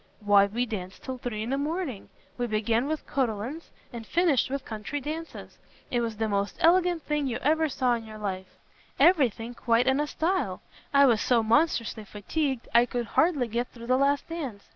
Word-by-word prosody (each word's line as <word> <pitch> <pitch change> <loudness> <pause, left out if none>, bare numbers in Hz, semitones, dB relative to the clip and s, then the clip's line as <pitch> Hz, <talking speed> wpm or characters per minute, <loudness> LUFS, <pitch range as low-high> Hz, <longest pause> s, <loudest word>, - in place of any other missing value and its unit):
"Why 205 -1 +5
we 235 +5 -1
danced 190 -5 -7
till 260 -1 -5
three 220 -3 -4
in 235 - -4
the 275 - 0
morning. 300 - -3 0.3
We 245 - -2
began 225 +3 0
with 310 0 -3
Cotillons, 255 +4 -2 0.2
and 235 -1 -6
finished 310 0 +2
with 275 0 -4
country 220 +6 -5
dances. 315 +4 -7 0.3
It 240 -2 +1
was 225 -2 -3
the 220 0 0
most 200 -1 -1
elegant 350 0 +3
thing 295 -2 -1
you 240 - -2
ever 315 +2 +2
saw 255 -2 +1
in 230 -1 -3
your 215 0 -9
life; 190 -3 -5 0.4
every 320 -8 +6
thing 230 +3 -8
quite 235 0 +2
in 265 +2 +2
a 295 - 0
style. 320 - -1 0.3
I 280 0 +6
was 230 -5 +3
so 240 -3 +3
monstrously 230 -2 +1
fatigued, 260 +6 -3
I 235 +1 +5
could 240 0 -2
hardly 300 -8 +3
get 235 +2 -2
through 235 -1 -12
the 255 +2 +2
last 280 +1 +1
dance. 275 -12 -6
245 Hz, 195 wpm, -27 LUFS, 220-295 Hz, 0.4 s, every